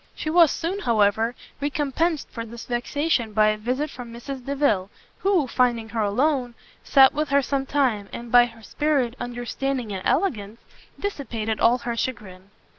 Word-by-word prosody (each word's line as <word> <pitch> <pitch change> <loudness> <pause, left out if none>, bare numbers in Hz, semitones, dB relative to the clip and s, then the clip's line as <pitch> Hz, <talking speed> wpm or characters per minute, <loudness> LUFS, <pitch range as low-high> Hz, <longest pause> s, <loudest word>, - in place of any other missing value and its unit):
She 310 - -3
was 335 -2 +6
soon, 345 +7 -2
however, 225 - +2 0.3
recompensed 295 +3 -1
for 230 - -5
this 235 +1 -9
vexation 245 -1 -1
by 215 0 +4
a 215 - 0
visit 255 +7 -2
from 245 -2 -9
Mrs 250 +3 -7
Delvile, 270 -9 0 0.3
who, 380 -6 +2
finding 240 -3 +1
her 225 -1 -2
alone, 245 +3 0 0.3
sat 270 -2 +6
with 300 0 -1
her 280 0 +3
some 270 0 -2
time, 245 -9 0
and 235 -1 -8
by 245 0 +7
her 225 -1 -15
spirit, 270 0 0
understanding 245 0 -3
and 190 - -4
elegance, 230 - 0 0.4
dissipated 235 - -3
all 235 +2 +4
her 235 -1 -4
chagrin. 195 -6 -5
245 Hz, 160 wpm, -24 LUFS, 225-280 Hz, 0.4 s, by